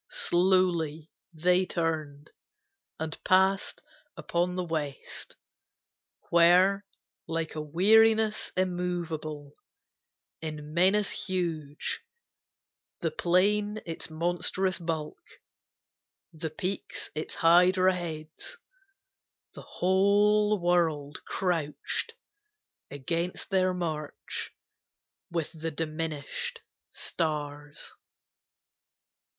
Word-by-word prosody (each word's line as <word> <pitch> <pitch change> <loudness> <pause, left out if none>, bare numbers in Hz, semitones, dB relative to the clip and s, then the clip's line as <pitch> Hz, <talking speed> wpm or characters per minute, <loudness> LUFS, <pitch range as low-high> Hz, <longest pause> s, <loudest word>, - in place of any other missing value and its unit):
Slowly 175 - +2 0.2
they 180 +3 +3
turned, 155 -3 -2 0.7
and 160 0 -5
passed 190 +1 +2 0.3
upon 175 +1 -1
the 180 - -1
west 155 -5 -5 1.0
Where, 180 +4 +5 0.4
like 165 -1 -2
a 155 - -3
weariness 220 +7 +4
immovable 170 -5 -2 0.9
In 150 -1 -6
menace 190 +4 +4
huge, 165 -6 -2 1.0
the 165 - 0
plain 205 +6 +2
its 165 -1 -5
monstrous 175 +3 0
bulk, 160 -3 -4 1.1
The 160 0 -4
peaks 185 +5 -4
its 155 +1 -4
hydra 185 +2 +5
heads, 160 - -6 1.0
the - - -9
whole 205 +3 +3
world 165 -5 +1
crouched 180 - -2 0.7
Against 165 +8 -3
their 185 -1 +3
march 160 -4 -4 0.8
with 165 -3 -2
the 165 -1 -4
diminished 155 -1 -3 0.3
stars. 145 -2 -4
170 Hz, 75 wpm, -29 LUFS, 155-185 Hz, 1.1 s, Where